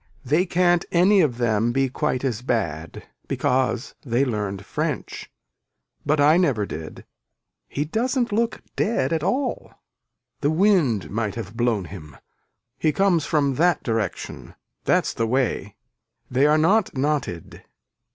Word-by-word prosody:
They 155 Hz, +8 st, +2 dB
can't 175 Hz, 0 st, +3 dB
any 190 Hz, +3 st, +5 dB
of 135 Hz, -8 st, +1 dB
them 115 Hz, -1 st, +1 dB
be 135 Hz, +2 st, +1 dB
quite 130 Hz, 0 st, -2 dB
as 120 Hz, -4 st, -1 dB
bad 85 Hz, -, -3 dB, 0.2 s
because 130 Hz, 0 st, 0 dB
they 125 Hz, +1 st, +1 dB
learned 105 Hz, -5 st, -3 dB
french -, -, -4 dB, 0.7 s
but 150 Hz, +1 st, +1 dB
I 150 Hz, +3 st, +5 dB
never 135 Hz, -, +2 dB
did. 80 Hz, -3 st, -8 dB, 0.6 s
He 145 Hz, -, -2 dB
doesn't 240 Hz, -, 0 dB
look 230 Hz, +2 st, 0 dB
dead 200 Hz, -, 0 dB
at 160 Hz, -, 0 dB
all. 265 Hz, -, -2 dB, 0.7 s
The 145 Hz, -, +1 dB
wind 160 Hz, -, +2 dB
might 105 Hz, -1 st, -2 dB
have 115 Hz, -1 st, -7 dB
blown 115 Hz, -5 st, 0 dB
him. 75 Hz, -8 st, -10 dB, 0.6 s
He 155 Hz, -, +2 dB
comes 185 Hz, -3 st, +2 dB
from 145 Hz, -4 st, +1 dB
that 175 Hz, +2 st, +2 dB
direction. 110 Hz, -5 st, -3 dB, 0.3 s
That's -, -, +2 dB
the 115 Hz, -, -1 dB
way. 125 Hz, -4 st, -1 dB, 0.6 s
They 135 Hz, +4 st, +4 dB
are 150 Hz, +1 st, +4 dB
not 185 Hz, +1 st, +2 dB
knotted. 135 Hz, -, -2 dB
135 Hz, 135 wpm, -23 LUFS, 115-170 Hz, 0.7 s, any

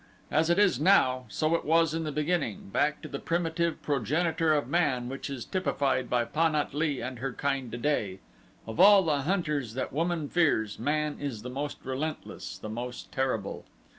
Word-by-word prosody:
As 160 Hz, +3 st, +2 dB
it 175 Hz, -, +3 dB
is 205 Hz, -2 st, +4 dB
now, 130 Hz, -10 st, +4 dB
so 155 Hz, +8 st, 0 dB
it 170 Hz, -, +1 dB
was 165 Hz, 0 st, +3 dB
in 165 Hz, 0 st, -2 dB
the 155 Hz, -, -2 dB
beginning, 150 Hz, -, -1 dB
back 150 Hz, +9 st, 0 dB
to -, -, -5 dB
the 140 Hz, -2 st, -5 dB
primitive 170 Hz, 0 st, -1 dB
progenitor 155 Hz, -, +1 dB
of 145 Hz, -5 st, +1 dB
man 140 Hz, -6 st, +1 dB
which 135 Hz, +2 st, -5 dB
is 135 Hz, -4 st, -5 dB
typified 140 Hz, -9 st, 0 dB
by 120 Hz, -1 st, +2 dB
Pan 155 Hz, +5 st, +1 dB
at 150 Hz, -2 st, -1 dB
lee 145 Hz, -2 st, 0 dB
and 125 Hz, 0 st, -5 dB
her 135 Hz, +2 st, -2 dB
kind 135 Hz, -4 st, -2 dB
today, 120 Hz, -6 st, -1 dB, 0.5 s
of 110 Hz, 0 st, -7 dB
all 200 Hz, 0 st, +8 dB
the 150 Hz, -4 st, +1 dB
hunters 150 Hz, -, -1 dB
that 130 Hz, -, -3 dB
woman 165 Hz, 0 st, -1 dB
fears, 140 Hz, -11 st, +1 dB
man 150 Hz, 0 st, -1 dB
is 125 Hz, -7 st, -4 dB
the 125 Hz, -, -6 dB
most 145 Hz, +3 st, -4 dB
relentless, 140 Hz, +4 st, -4 dB
the -, -, -8 dB
most 120 Hz, +3 st, -6 dB
terrible. 130 Hz, -7 st, -2 dB
145 Hz, 185 wpm, -28 LUFS, 130-165 Hz, 0.5 s, all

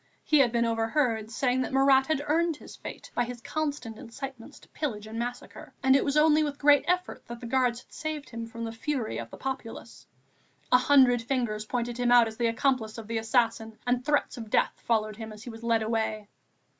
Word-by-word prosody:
He 300 Hz, -, +4 dB
had 250 Hz, -4 st, +4 dB
been 235 Hz, 0 st, +2 dB
overheard 225 Hz, 0 st, 0 dB
saying 250 Hz, +2 st, 0 dB
that -, -, -3 dB
Marat 270 Hz, 0 st, +4 dB
had 300 Hz, -2 st, 0 dB
earned 330 Hz, +2 st, +1 dB
his -, -, -12 dB
fate -, -, -9 dB
by 245 Hz, -, +1 dB
his 245 Hz, 0 st, -6 dB
constant 280 Hz, -5 st, -4 dB
incitements 260 Hz, 0 st, -8 dB
to -, -, -18 dB
pillage 220 Hz, -9 st, -4 dB
and 220 Hz, +1 st, -6 dB
massacre, 245 Hz, +1 st, -6 dB
and 265 Hz, 0 st, +5 dB
it 275 Hz, -, +4 dB
was 280 Hz, +1 st, 0 dB
only 305 Hz, 0 st, +5 dB
with 290 Hz, -2 st, -3 dB
great 285 Hz, 0 st, +4 dB
difficulty 360 Hz, +1 st, 0 dB
that 235 Hz, 0 st, -7 dB
the 240 Hz, -, -8 dB
Guards 245 Hz, 0 st, +1 dB
had -, -, -24 dB
saved 310 Hz, -1 st, -5 dB
him 230 Hz, -1 st, -5 dB
from 230 Hz, 0 st, -7 dB
the 225 Hz, -, -3 dB
fury 240 Hz, 0 st, -3 dB
of -, -, -7 dB
the -, -, -10 dB
populace. 255 Hz, -4 st, -6 dB, 0.6 s
A 250 Hz, -, +7 dB
hundred 255 Hz, -3 st, +5 dB
fingers 230 Hz, -4 st, -2 dB
pointed 240 Hz, +1 st, -3 dB
him 245 Hz, -1 st, +2 dB
out 240 Hz, -2 st, +7 dB
as 220 Hz, 0 st, -8 dB
the 235 Hz, -, +1 dB
accomplice 230 Hz, -2 st, 0 dB
of 225 Hz, -, -7 dB
the 225 Hz, +1 st, -2 dB
assassin, 225 Hz, -1 st, 0 dB
and 245 Hz, 0 st, +1 dB
threats 290 Hz, -1 st, 0 dB
of 225 Hz, -2 st, -7 dB
death -, -, +2 dB
followed 215 Hz, -2 st, -1 dB
him 220 Hz, -1 st, -7 dB
as 210 Hz, 0 st, -11 dB
he 240 Hz, -, -7 dB
was 225 Hz, 0 st, -11 dB
led 230 Hz, -1 st, +1 dB
away. 220 Hz, -2 st, -2 dB
245 Hz, 220 wpm, -28 LUFS, 225-275 Hz, 0.6 s, A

